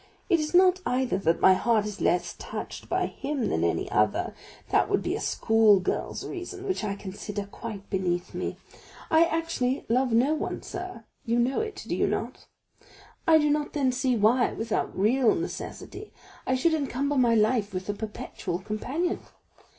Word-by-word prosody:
It 345 Hz, -3 st, +4 dB
is 305 Hz, +2 st, -2 dB
not, 370 Hz, 0 st, +5 dB
either, 250 Hz, -6 st, 0 dB
that 170 Hz, -3 st, +1 dB
my 190 Hz, -, +7 dB
heart 220 Hz, +2 st, +2 dB
is 210 Hz, -1 st, -6 dB
less 175 Hz, -1 st, +1 dB
touched -, -, -7 dB
by -, -, +1 dB
him 275 Hz, -2 st, -3 dB
than -, -, 0 dB
any -, -, 0 dB
other; -, -, +1 dB, 0.4 s
that -, -, +3 dB
would -, -, +1 dB
be -, -, -1 dB
a -, -, -4 dB
schoolgirl's 220 Hz, -4 st, +2 dB
reason, 375 Hz, +1 st, -6 dB
which 375 Hz, -, -1 dB
I 200 Hz, -2 st, -2 dB
consider 200 Hz, +1 st, -6 dB
quite 200 Hz, 0 st, -8 dB
beneath 175 Hz, -2 st, -1 dB
me. -, -, -3 dB, 0.5 s
I 320 Hz, +1 st, +6 dB
actually 325 Hz, -6 st, -1 dB
love 250 Hz, +2 st, +2 dB
no 245 Hz, +7 st, +3 dB
one, 315 Hz, -, -3 dB
sir; 365 Hz, -, -7 dB, 0.2 s
you 235 Hz, +1 st, 0 dB
know 245 Hz, +3 st, +2 dB
it, 435 Hz, -2 st, -5 dB
do -, -, -1 dB
you -, -, +2 dB
not? -, -, -4 dB, 0.8 s
I 320 Hz, -1 st, +7 dB
do 300 Hz, -1 st, +3 dB
not 295 Hz, 0 st, -1 dB
then 275 Hz, -4 st, +2 dB
see 250 Hz, -1 st, +1 dB
why, 230 Hz, +4 st, +3 dB
without 225 Hz, 0 st, -2 dB
real 230 Hz, +5 st, +3 dB
necessity, 425 Hz, -, -6 dB, 0.4 s
I 260 Hz, -, +2 dB
should 320 Hz, +6 st, +2 dB
encumber 280 Hz, -1 st, -1 dB
my 240 Hz, -3 st, +4 dB
life 215 Hz, -1 st, +2 dB
with 185 Hz, -1 st, -5 dB
a 205 Hz, -, -1 dB
perpetual 210 Hz, -4 st, -5 dB
companion. 250 Hz, -, -2 dB
245 Hz, 175 wpm, -27 LUFS, 210-300 Hz, 0.8 s, my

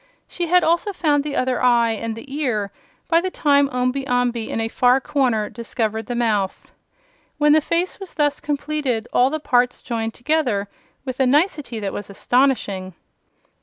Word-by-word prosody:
She 350 Hz, -1 st, -3 dB
had 360 Hz, +2 st, +4 dB
also 340 Hz, +5 st, +1 dB
found 295 Hz, -5 st, +1 dB
the 295 Hz, -1 st, -4 dB
other 255 Hz, -1 st, 0 dB
eye 240 Hz, -2 st, +4 dB
and 225 Hz, 0 st, -3 dB
the 270 Hz, +4 st, -9 dB
ear 220 Hz, -9 st, -1 dB, 0.4 s
by 335 Hz, 0 st, +3 dB
the 375 Hz, -, -2 dB
time 285 Hz, -5 st, +2 dB
Omby 255 Hz, +2 st, -1 dB
Amby 245 Hz, -2 st, 0 dB
in -, -, -2 dB
a 225 Hz, -, 0 dB
far 250 Hz, +3 st, +3 dB
corner 250 Hz, -6 st, 0 dB
discovered 225 Hz, -2 st, -3 dB
the 245 Hz, -, -3 dB
mouth. 215 Hz, -5 st, -1 dB, 0.7 s
When 295 Hz, 0 st, +4 dB
the 310 Hz, -, +5 dB
face 340 Hz, +6 st, -1 dB
was 390 Hz, -2 st, -9 dB
thus 295 Hz, -2 st, +1 dB
completed, 290 Hz, -5 st, -2 dB
all 250 Hz, +1 st, +4 dB
the 310 Hz, +2 st, -3 dB
parts 250 Hz, -4 st, +1 dB
joined 225 Hz, -2 st, -4 dB
together 245 Hz, -8 st, 0 dB, 0.4 s
with 255 Hz, -1 st, -5 dB
a 265 Hz, -, +3 dB
nicety 290 Hz, -, +1 dB
that 195 Hz, -1 st, -3 dB
was 205 Hz, -, -6 dB
astonishing. 200 Hz, -5 st, 0 dB
255 Hz, 170 wpm, -21 LUFS, 225-295 Hz, 0.7 s, the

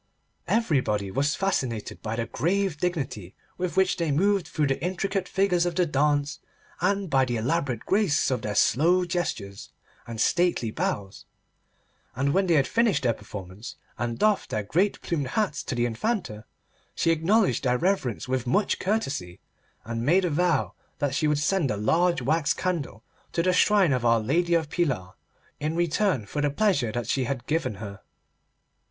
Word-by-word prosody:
Everybody 130 Hz, -, +1 dB
was 145 Hz, +7 st, +1 dB
fascinated 130 Hz, -, -2 dB
by 110 Hz, 0 st, -3 dB
the 115 Hz, 0 st, -2 dB
grave 190 Hz, +4 st, 0 dB
dignity 140 Hz, -, -3 dB, 0.2 s
with 180 Hz, 0 st, -2 dB
which 190 Hz, 0 st, +3 dB
they 170 Hz, -3 st, -1 dB
moved 190 Hz, +3 st, +2 dB
through 155 Hz, -3 st, 0 dB
the 135 Hz, +1 st, -1 dB
intricate 190 Hz, +1 st, -1 dB
figures 185 Hz, -2 st, +2 dB
of 175 Hz, -1 st, -1 dB
the 180 Hz, -1 st, +3 dB
dance, 145 Hz, -1 st, +1 dB, 0.4 s
and 200 Hz, -1 st, +1 dB
by 135 Hz, -4 st, +3 dB
the 120 Hz, -2 st, -1 dB
elaborate 130 Hz, 0 st, -1 dB
grace 190 Hz, -9 st, +2 dB
of 125 Hz, -3 st, -1 dB
their 105 Hz, -1 st, -3 dB
slow 175 Hz, -, +3 dB
gestures, 115 Hz, -, -4 dB, 0.4 s
and 115 Hz, -1 st, -6 dB
stately 170 Hz, -6 st, +1 dB
bows, 100 Hz, -2 st, -3 dB, 0.9 s
and 140 Hz, +3 st, 0 dB
when 190 Hz, 0 st, +2 dB
they 170 Hz, -, +4 dB
had 140 Hz, -3 st, +4 dB
finished 230 Hz, -8 st, +1 dB
their 120 Hz, -2 st, +3 dB
performance 100 Hz, +1 st, -9 dB, 0.2 s
and 115 Hz, -1 st, -3 dB
doffed 215 Hz, -2 st, +2 dB
their 105 Hz, -, -2 dB
great 180 Hz, -, +1 dB
plumed 145 Hz, -6 st, -2 dB
hats 185 Hz, 0 st, -1 dB
to -, -, -4 dB
the 120 Hz, 0 st, +1 dB
Infanta, 120 Hz, -, -2 dB, 0.5 s
she 165 Hz, -, +2 dB
acknowledged 190 Hz, +7 st, +2 dB
their 125 Hz, -2 st, +2 dB
reverence 170 Hz, -, -1 dB
with 130 Hz, -1 st, -1 dB
much 205 Hz, -, +1 dB
courtesy, 135 Hz, -, -2 dB, 0.5 s
and 115 Hz, +1 st, -3 dB
made 180 Hz, +8 st, +3 dB
a 175 Hz, -, 0 dB
vow 170 Hz, -1 st, +1 dB, 0.2 s
that 145 Hz, -2 st, -1 dB
she 150 Hz, +2 st, +1 dB
would 150 Hz, -1 st, +2 dB
send 155 Hz, 0 st, +1 dB
a 105 Hz, -, -1 dB
large 165 Hz, -, +2 dB
wax 155 Hz, +3 st, +1 dB
candle 155 Hz, -, -3 dB, 0.3 s
to 170 Hz, -, +1 dB
the 185 Hz, 0 st, +2 dB
shrine 190 Hz, -4 st, +4 dB
of 125 Hz, -2 st, -1 dB
Our 115 Hz, -1 st, +4 dB
Lady 170 Hz, +10 st, +1 dB
of 160 Hz, -2 st, +1 dB
Pilar 130 Hz, -, -1 dB, 0.5 s
in 155 Hz, +2 st, -2 dB
return 170 Hz, -, +1 dB
for 145 Hz, +8 st, -3 dB
the 145 Hz, -, +2 dB
pleasure 145 Hz, -, +1 dB
that 120 Hz, +1 st, -3 dB
she 130 Hz, -2 st, 0 dB
had 125 Hz, -1 st, -4 dB
given 150 Hz, -8 st, -1 dB
her. 100 Hz, -1 st, -8 dB
150 Hz, 170 wpm, -26 LUFS, 120-180 Hz, 0.9 s, they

